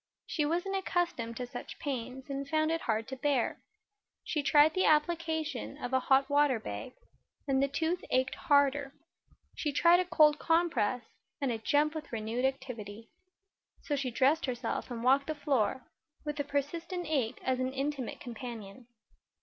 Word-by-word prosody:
She 300 -2 0
wasn't 355 +5 -1
accustomed 345 -11 -1
to 250 - -3
such 245 - -8
pains 260 -1 -5
and 275 0 -4
found 310 +1 +2
it 330 0 -1
hard 220 0 -1
to 265 - -4
bear. 265 -2 0 0.6
She 300 - -1
tried 295 +2 +5
the 370 - +2
application 315 - 0
of 245 - -5
a 260 - +4
hot 270 +1 +3
water 285 -4 +3
bag, 105 - -6 0.5
and 270 -1 +2
the 275 - +3
tooth 320 +5 -1
ached 260 +1 +1
harder; 285 -2 +2 0.6
she 300 - -2
tried 340 +5 +5
a 365 - +1
cold 305 -4 +5
compress, 325 -8 +1 0.4
and 275 -4 0
it 225 -1 -4
jumped 300 +3 +2
with 315 -1 -7
renewed 230 +2 -2
activity. 230 -5 -4 0.7
So 290 - -1
she 270 -2 -1
dressed 275 +6 +2
herself 245 -1 -3
and 235 -2 -5
walked 270 +2 +4
the 310 - -2
floor, 265 -4 0 0.4
with 295 0 -3
the 285 - 0
persistent 330 +6 -3
ache 270 -8 0
as 260 -1 0
an 255 0 0
intimate 270 -1 -3
companion. 235 -2 -8
275 Hz, 165 wpm, -31 LUFS, 250-310 Hz, 0.7 s, tried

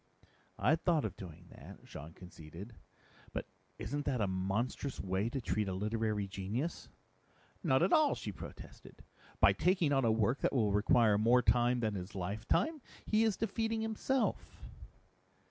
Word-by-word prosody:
"I'd 160 +2 +2
thought 165 -8 +2
of 100 -3 -4
doing 85 -2 -10
that," - - -13
Jean 75 +3 -9
conceded. 90 +4 -11 0.6
"But - - -3 0.3
isn't 140 +6 -3
that 130 -3 0
a 105 - +2
monstrous 100 +8 -2
way 95 +3 -1
to 135 - -3
treat 105 -3 -1
a 95 - -2
literary 105 0 -1
genius?" 100 - -4 0.7
"Not 130 +4 +3
at 185 - +3
all!" 305 -2 +5
she - - -5
protested. - - -11 0.4
"By - - +6
taking 180 -5 +2
on 135 -1 +3
a 115 - +4
work 115 +4 +1
that - - 0
will 110 -6 +2
require 105 0 +4
more 120 +3 +4
time 120 0 +3
than 110 -2 0
his 95 +1 -6
lifetime, 105 - -1 0.2
he 215 +1 +3
is 220 -3 +1
defeating 225 +1 -1
himself." 225 +4 0
115 Hz, 155 wpm, -34 LUFS, 100-145 Hz, 0.7 s, By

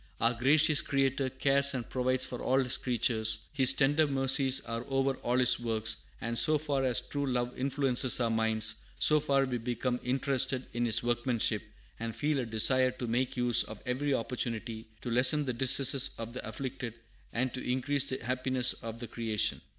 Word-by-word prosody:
"Our 115 +1 +2
gracious 145 +5 +3
Creator 135 -1 -1
cares 140 +1 +2
and 120 -3 -5
provides 130 0 -1
for 125 -2 -7
all 130 - +1
His 125 0 +2
creatures; 110 -3 +1
His 135 -3 +4
tender 145 +3 +2
mercies 135 -1 +2
are 115 0 -5
over 135 0 0
all 120 +1 -2
His 125 -2 +6
works, 110 -2 -1 0.2
and 115 0 -1
so 155 -1 +4
far 145 -3 -2
as 125 -2 +2
true 140 -1 -4
love 125 0 -2
influences 130 -2 +2
our 115 -2 0
minds, 110 -1 +1 0.2
so 155 0 +4
far 140 -2 +1
we 125 -2 -4
become 125 +1 -3
interested 130 0 0
in 120 0 -1
His 115 - +3
workmanship, 120 0 0 0.4
and 115 -1 -5
feel 150 -1 -1
a 125 - -3
desire 130 +4 +4
to 125 0 -7
make 125 +3 -2
use 120 -1 +3
of 110 -1 -8
every 130 +3 -2
opportunity 115 -2 -5 0.2
to 120 - -4
lessen 135 +5 +3
the 130 - -2
distresses 130 +1 +3
of 115 0 -7
the 125 - -7
afflicted, 120 0 -6 0.4
and 125 +1 -2
to 130 - -5
increase 130 +2 -1
the 130 - -5
happiness 130 0 0
of 115 -1 -7
the 120 0 -8
creation. 110 -3 -2
125 Hz, 180 wpm, -30 LUFS, 115-135 Hz, 0.4 s, His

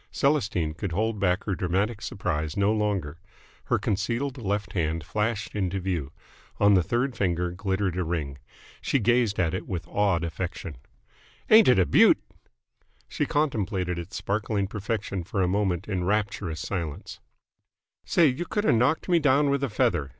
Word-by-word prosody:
Celestine 110 - +1
could 90 +2 -4
hold 110 +3 -1
back 90 0 +1
her 100 - -2
dramatic 95 +5 -1
surprise 80 -4 -3
no 100 +2 +3
longer. 100 -8 -1 0.5
Her - - +2
concealed 125 +7 -2
left 100 -2 -2
hand 80 -2 -1
flashed 105 +5 -2
into 95 -2 -1
view. 85 -7 -3 0.5
On 100 0 +5
the 95 - +5
third 120 - -1
finger 90 -2 0
glittered 95 0 -1
a 90 - 0
ring. 75 -5 -3 0.4
She - - +1
gazed 120 -3 +2
at 85 -2 +1
it 95 - -4
with 90 -3 -4
awed 100 -5 +1
affection. 85 -3 -5 0.7
"Ain't 220 0 +8
it 125 - +6
a 95 - +4
beaut!" - - +6 0.9
She - - -2
contemplated 100 - -1
its 85 +5 -8
sparkling 100 0 -1
perfection 100 -2 -3
for 95 +2 -1
a - - +2
moment 95 -2 0
in 95 -4 -2
rapturous 100 -5 -1
silence. 85 -7 -5 0.8
"Say, 170 - +3
you 145 +4 +1
could 210 - -1
have 210 - +4
knocked 125 +7 +2
me 175 -2 +4
down 145 -1 +3
with 140 0 0
a 135 - 0
feather!" 85 -9 +1
100 Hz, 165 wpm, -26 LUFS, 90-110 Hz, 0.9 s, Ain't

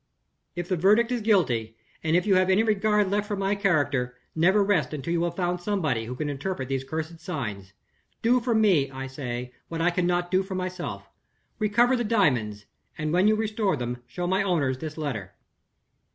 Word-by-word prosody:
"If 175 0 -4
the 185 - +1
verdict 215 +7 +4
is 245 -2 0
guilty, 125 - +1 0.3
and 160 +1 +2
if 180 - +2
you 205 - +3
have 185 0 +3
any 190 +4 +4
regard 210 -2 +2
left 205 +1 0
for 205 - -2
my 195 0 0
character, 145 - 0 0.2
never 190 +6 +4
rest 165 -8 +1
until 150 +4 -3
you 170 - +1
have 170 0 -3
found 180 -1 -1
somebody 160 - -1
who 125 +2 -5
can 150 +4 -3
interpret 140 -1 -3
these 135 -1 -1
cursed 160 +3 -5
signs. 105 - -5 0.5
Do 245 +2 +4
for 235 -1 0
me, 190 -11 +3
I 135 0 -6
say, 125 -2 -5
what 165 - -5
I 175 +2 +3
cannot 175 0 0
do 185 0 +3
for 190 0 -6
myself. 180 - -4 0.5
Recover 235 +4 +3
the 240 - 0
diamonds; 125 - +1 0.3
and, 155 +1 -2
when 185 +3 +4
you 215 - +4
restore 215 -5 0
them, 125 0 -4
show 175 - -4
my 190 +3 +1
owners 150 -9 0
this 155 +1 -6
letter. 115 - -4
175 Hz, 195 wpm, -26 LUFS, 135-200 Hz, 0.5 s, verdict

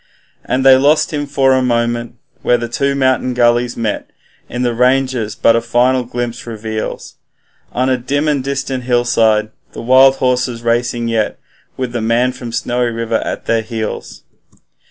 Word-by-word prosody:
Then 130 +1 0
they 135 -1 +7
lost 145 +4 +2
him 145 -1 -2
for 135 -1 +2
a 130 - +2
moment, 120 -1 -1 0.3
where 120 - +3
two 140 +4 -1
mountain 130 -2 +1
gullies 120 0 +2
met 110 -3 -3 0.4
In 125 +1 -3
the 120 -1 0
ranges, 125 -2 +1
but 115 - +3
a 115 - +1
final 125 +2 +1
glimpse 120 0 -5
reveals 110 -1 -5 0.5
On 130 +1 0
a 130 -1 +1
dim 145 +5 -1
and 145 -3 0
distant 135 -2 -3
hillside 115 -3 +2 0.2
the - - -7
wild 130 +2 +6
horses 125 -2 -1
racing 120 0 0
yet, 115 -2 -1 0.4
With 130 -2 -3
the 120 -1 -3
man 115 +3 +1
from 125 -2 -8
Snowy 120 +1 -1
River 115 -1 -2
at - - -5
their 115 -1 +1
heels. 110 -1 -6
120 Hz, 160 wpm, -16 LUFS, 115-130 Hz, 0.5 s, they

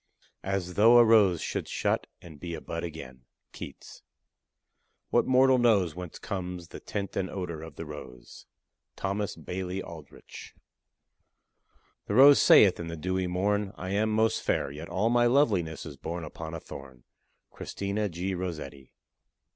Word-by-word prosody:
As 95 -2 -2
though 115 +5 +6
a 120 - +8
rose 105 -6 +4
should - - -3
shut, - - -1 0.2
and 80 -4 -12
be 85 0 -5
a - - -6
bud 85 +2 -5
again. 65 -7 -8 0.3
KEATS. - - -10 1.1
What - - +3
mortal 130 0 +5
knows 100 -9 +3
Whence 90 0 -8
comes 90 -4 -5
the - - -9
tint 100 -1 -5
and 95 -1 -1
odor 85 -5 -5
of 80 -2 -10
the 80 - -7
rose. 70 -5 -11 0.5
THOMAS 100 0 -2
BAILEY 90 +3 -5
ALDRICH. 80 -4 -12 1.5
The - - -1
rose 140 +2 +8
saith 100 -4 +6
in 85 - -5
the 85 0 -6
dewy 95 +3 -1
morn, 100 +3 0
I 95 +1 -6
am 105 +2 +1
most 110 +1 +2
fair; - - -1
Yet 75 +4 -8
all 105 +6 +1
my 120 0 +4
loveliness 105 - +1
is 75 -4 -9
born 85 +5 -5
Upon 80 +1 -7
a - - -5
thorn. 65 -5 -11 0.5
CHRISTINA 100 +1 -3
G. 90 +3 -3
ROSSETTI. 75 -7 -6
90 Hz, 155 wpm, -28 LUFS, 80-105 Hz, 1.5 s, a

